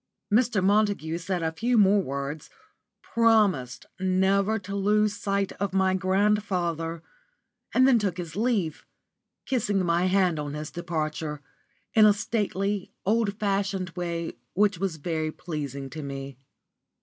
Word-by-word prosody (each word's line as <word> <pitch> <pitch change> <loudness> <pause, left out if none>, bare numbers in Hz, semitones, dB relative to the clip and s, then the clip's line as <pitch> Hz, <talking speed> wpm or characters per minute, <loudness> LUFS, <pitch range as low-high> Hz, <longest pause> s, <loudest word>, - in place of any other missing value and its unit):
Mr. 225 -4 +3
Montague 200 -5 +1
said 180 -1 -2
a 160 - 0
few 235 +9 0
more 200 -1 +5
words, 140 0 -5 0.5
promised 210 - +2
never 190 +3 +2
to 200 -1 -6
lose 210 +1 +2
sight 200 -1 -1
of 200 -1 -2
my 190 -1 +3
grandfather 185 -4 0 0.7
and 260 +1 +5
then 250 -4 +5
took 195 -4 -1
his 170 -3 -6
leave, 205 -8 0 0.6
kissing 205 -7 0
my 170 +2 +2
hand 185 -4 +2
on 145 0 -4
his 150 0 -6
departure, 155 -3 -3 0.5
in 215 -1 +7
a 210 - +6
stately, 205 -2 -2
old 210 0 +1
fashioned 195 -3 -1
way 170 -1 -3 0.2
which 200 -2 +2
was 190 -3 -1
very 155 0 -2
pleasing 140 -5 -5
to 155 - -6
me. 135 -1 -6
190 Hz, 135 wpm, -26 LUFS, 165-205 Hz, 0.7 s, in